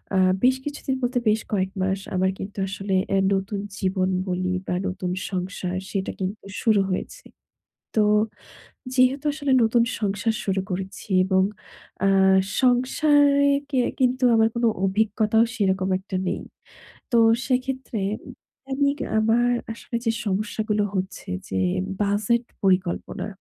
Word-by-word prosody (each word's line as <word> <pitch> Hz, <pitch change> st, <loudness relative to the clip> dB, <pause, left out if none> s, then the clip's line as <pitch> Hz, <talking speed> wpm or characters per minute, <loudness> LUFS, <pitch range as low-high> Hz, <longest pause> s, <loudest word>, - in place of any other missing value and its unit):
আ -, -, +3 dB, 0.3 s
বেশ 255 Hz, +1 st, +5 dB
কিছুদিন 290 Hz, -2 st, -3 dB
বলতে 245 Hz, +1 st, +1 dB
বেশ 215 Hz, +1 st, +2 dB
কয়েক 190 Hz, -1 st, 0 dB
মাস 190 Hz, +1 st, 0 dB, 0.2 s
আমার 190 Hz, +1 st, +2 dB
কিন্তু 200 Hz, +1 st, -7 dB
আসলে 195 Hz, 0 st, -2 dB, 0.2 s
এ -, -, +3 dB, 0.2 s
নতুন 195 Hz, +1 st, -2 dB, 0.2 s
জীবন 185 Hz, -1 st, 0 dB, 0.2 s
বলি 185 Hz, 0 st, -1 dB, 0.2 s
বা -, -, -1 dB
নতুন 185 Hz, -1 st, -3 dB, 0.2 s
সংসার 185 Hz, 0 st, -3 dB
সেটা 195 Hz, -2 st, -2 dB
কিন্তু 195 Hz, +2 st, -4 dB, 0.2 s
শুরু 215 Hz, -3 st, +4 dB
হয়েছে। -, -, -4 dB, 0.7 s
তো 215 Hz, -, +4 dB, 0.9 s
যেহেতু 260 Hz, +3 st, +3 dB
আসলে 285 Hz, -2 st, -2 dB
নতুন 230 Hz, +1 st, +3 dB, 0.2 s
সংসার 205 Hz, +2 st, 0 dB
শুরু 190 Hz, -1 st, 0 dB
করেছি 190 Hz, +3 st, -5 dB, 0.2 s
এবং 190 Hz, 0 st, +3 dB, 0.6 s
আ -, -, +4 dB, 0.5 s
সংসারে 280 Hz, +3 st, +4 dB, 0.2 s
কে 265 Hz, -3 st, +1 dB, 0.2 s
কিন্তু 255 Hz, 0 st, +2 dB
আমার 225 Hz, 0 st, +4 dB
কোনো 235 Hz, 0 st, +2 dB, 0.2 s
অভিজ্ঞতাও 215 Hz, +2 st, +2 dB
সেরকম 190 Hz, -3 st, +1 dB
একটা 190 Hz, 0 st, -7 dB
নেই। 185 Hz, -, -2 dB, 0.7 s
তো 240 Hz, -, +4 dB, 0.3 s
সেক্ষেত্রে 255 Hz, -4 st, -1 dB, 0.7 s
দৈনিক 280 Hz, +1 st, +1 dB, 0.2 s
আমার 235 Hz, +3 st, +3 dB, 0.2 s
আসলে 235 Hz, -, -8 dB
যে 225 Hz, -, +3 dB
সমস্যাগুলো 210 Hz, +1 st, -1 dB
হচ্ছে 190 Hz, +1 st, -4 dB, 0.2 s
যে 95 Hz, -, -1 dB, 0.4 s
বাজেট 210 Hz, +4 st, +1 dB, 0.2 s
পরিকল্পনা। 185 Hz, 0 st, 0 dB
210 Hz, 130 wpm, -24 LUFS, 190-245 Hz, 0.9 s, বেশ